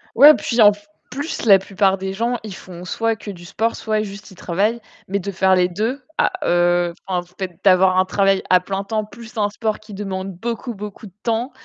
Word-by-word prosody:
Ouais, 285 +6 +10
puis 235 -1 0
en 205 -1 +9
f 205 0 -17 0.2
plus, 285 +4 -4
la 200 -3 +8
plupart 195 0 +1
des 190 0 -4
gens, 235 +4 -1
ils 215 -3 -7
font 180 -2 -10
soit 225 +4 0
que 210 - -10
du 175 -2 -12
sport, 225 +6 -1
soit 215 -1 -1
juste 200 0 -9
ils - - -14
travaillent 200 +6 0 0.3
mais 200 +2 -1
de 200 +1 -4
faire 190 0 +3
les 180 -1 +3
2 225 +9 -3 0.2
à - - +3 0.2
heu, 175 0 +2
enfin, 185 -2 0
en - - -6 0.2
fait 185 -3 -5
d'avoir 185 -1 +5
un 185 - +4
travail 195 0 +2
à 185 - +7
plein 195 +2 -4
temps 215 +1 -2
plus 235 +2 -13
un 205 -1 +1
sport 215 +1 -2
qui 215 -1 -13
demande 195 -1 -4
beaucoup, 235 +5 -4
beaucoup 205 +1 -8
de 190 - -17
temps, 235 +3 -1
200 Hz, 225 wpm, -20 LUFS, 185-220 Hz, 0.3 s, Ouais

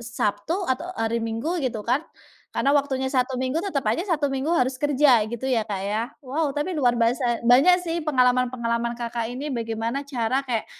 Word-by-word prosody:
Sabtu 230 +3 -2
atau 260 +3 -1
hari 225 +1 0
Minggu 230 +10 -2
gitu 230 -6 -3
kan, 250 +4 +2 0.5
karena 275 - +2
waktunya 270 -2 +1
Sabtu 255 -1 +1
Minggu, 260 +4 -1
tetep 305 - -2
aja 225 +11 +1
Sabtu 290 - 0
Minggu 270 +3 -2
harus 260 -4 +2
kerja 285 -5 +4
gitu 235 +2 -6
ya 235 -3 +2
Kak 195 -2 -3
ya. 215 +2 0 0.2
Wow 290 +3 -1
tapi 300 +6 -1
luar 250 -5 +2
basa, 240 +1 +1
banyak 275 +9 +7
sih 335 0 -2
pengalaman-pengalaman 250 -4 +1
Kakak 235 -1 -3
ini, 270 +3 -4
bagaimana 230 +3 -2
cara 255 -1 0
kayak 235 -4 -1
255 Hz, 180 wpm, -24 LUFS, 230-280 Hz, 0.5 s, banyak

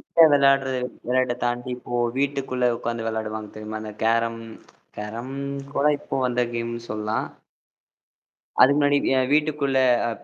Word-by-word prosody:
இப்ப 165 - +5
விளையாடுறது 135 -2 +3 0.3
விளையாட்ட 125 -1 +2
தாண்டி, 120 +1 -2
இப்போ 120 0 -4 0.2
வீட்டுக்குள்ள 135 -3 0
உக்காந்து 115 -1 -3
விளையாடுவாங்க 110 -1 -4
தெரியுமா? 110 0 -6
அந்த 110 -1 -7
கேரம் 115 0 +1 0.6
கேரம் 115 +5 -6 0.4
கூட 140 - +2
இப்போ - - -4
வந்த 125 0 0
கேம்னு 115 0 -3
சொல்லாம். 105 +1 -2 1.4
அது 135 - +8
முன்னாடி 145 -1 +3 0.2
அ - - +3
வீட்டுக்குள்ள 150 -2 +1 0.3
அ - - -1
120 Hz, 130 wpm, -24 LUFS, 115-135 Hz, 1.4 s, அது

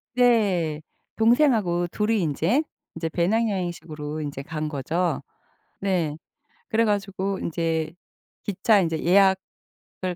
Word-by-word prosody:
네. 200 -11 +3 0.3
동생하고 220 - +3
둘이 210 +2 0
인제 170 - +1 0.3
인제 165 0 -3
배낭 210 +8 +1
여행식으로 160 -5 -4
인제 145 -2 -5
간 155 +1 -4
거죠. 160 +4 -1 0.6
네. 175 -6 0 0.5
그래 230 0 +2
가지고 195 -2 -1
인제 165 -1 -1 0.5
기차 205 +1 +3
인제 165 -3 -1
예약을 190 -1 0
180 Hz, 225 characters per minute, -25 LUFS, 160-205 Hz, 0.6 s, 네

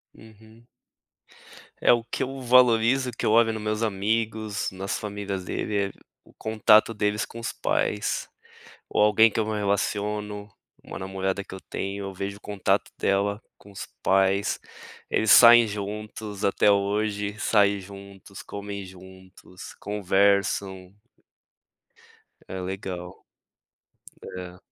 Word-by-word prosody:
Uhum. 110 +1 -18 1.1
É - - +5
o 120 - 0
que 120 - -3
eu 135 +1 -5
valorizo, 125 +1 +4
que 115 - -8
eu - - +2
olho 115 0 +4
no 110 - -4
meus 105 +1 -2
amigos, 110 +1 -1
nas 95 +1 -4
famílias 100 -2 -5
dele, 105 +3 -3
é - - -12 0.3
o - - -21
contato 110 0 +3
deles 105 -1 -1
com 115 - -9
os 115 - -4
pais, - - -1 0.6
ou - - 0
alguém 105 +1 +5
que - - -2
eu 110 - +1
me 110 -1 -2
relaciono, 105 0 -2 0.4
uma - - -8
namorada 95 +1 -3
que - - -12
eu - - -8
tenho, 100 +1 -5
eu 95 - -6
vejo 100 +2 -5
o - - -22
contato 100 -2 -1
dela 100 +2 0 0.2
com 100 - -17
os 100 - -8 0.2
pais, 95 +1 +2 0.5
eles 110 - +2
saem 120 -1 +9
juntos 105 0 -5
até 100 +1 +3
hoje. 100 +1 0
Saem 100 -2 +3
juntos, 100 0 -12
comem 100 -1 -7
juntos, 95 0 -13
conversam. 100 -1 0 1.6
É, 95 - -5
legal. 90 -1 -6 1.0
É. 90 -1 -8
100 Hz, 130 wpm, -25 LUFS, 95-110 Hz, 1.6 s, saem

